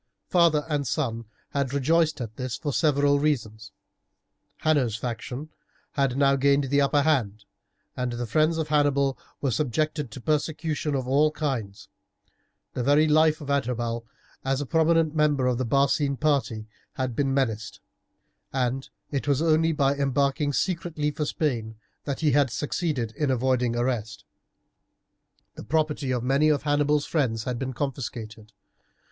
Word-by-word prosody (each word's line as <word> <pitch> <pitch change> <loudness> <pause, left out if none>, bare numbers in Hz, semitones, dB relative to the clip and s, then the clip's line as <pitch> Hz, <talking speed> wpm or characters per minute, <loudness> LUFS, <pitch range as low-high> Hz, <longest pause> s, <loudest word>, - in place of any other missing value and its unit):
Father 165 -4 +3
and 145 -3 -1
son 115 -5 -2 0.3
had 140 -1 -1
rejoiced 155 +3 +2
at 110 -2 -6
this 130 -1 -4
for 145 -3 -3
several 145 -2 +3
reasons. 110 -8 -2 0.9
Hanno's 140 -8 +2
faction 125 +5 -5 0.4
had 135 -2 0
now 140 -1 +4
gained 140 +1 +3
the 145 0 +4
upper 140 +1 +3
hand, 110 -9 0 0.5
and 125 -1 -2
the 120 0 -3
friends 155 +8 +2
of 160 -2 -2
Hannibal 140 -2 +2 0.3
were 135 - 0
subjected 150 +3 -1
to 110 - -9
persecution 150 +1 -1
of 130 -2 -2
all 145 +4 +4
kinds. 130 -10 -4 0.9
The - - -2
very 145 +5 +4
life 155 +1 +3
of 145 -1 -4
Adherbal 120 -4 -1 0.4
as 135 0 0
a 145 - -2
prominent 160 +1 +2
member 150 -4 +2
of 125 -1 +1
the 130 - -1
Barcine 140 +2 +2
party 135 -8 0 0.3
had 130 -4 -3
been 135 0 +1
menaced. 115 -6 -1 0.7
And 130 0 -1 0.2
it 140 0 -2
was 140 -2 +2
only 160 0 +3
by 140 -3 +2
embarking 140 +1 0
secretly 160 -1 -1
for 150 +1 -3
Spain 120 -8 -2 0.3
that 140 0 -3
he 155 -2 +3
had 140 -1 +3
succeeded 140 -3 -2
in 150 -2 0
avoiding 125 -1 +1
arrest. 120 -4 -2 1.3
The - - -9
property 150 +1 0
of 125 -2 -1
many 140 +4 +3
of 145 -2 +1
Hannibal's 145 0 +2
friends 120 -9 0
had 125 0 -3
been 130 -1 -3
confiscated. 115 -5 -5
140 Hz, 150 wpm, -26 LUFS, 125-150 Hz, 1.3 s, now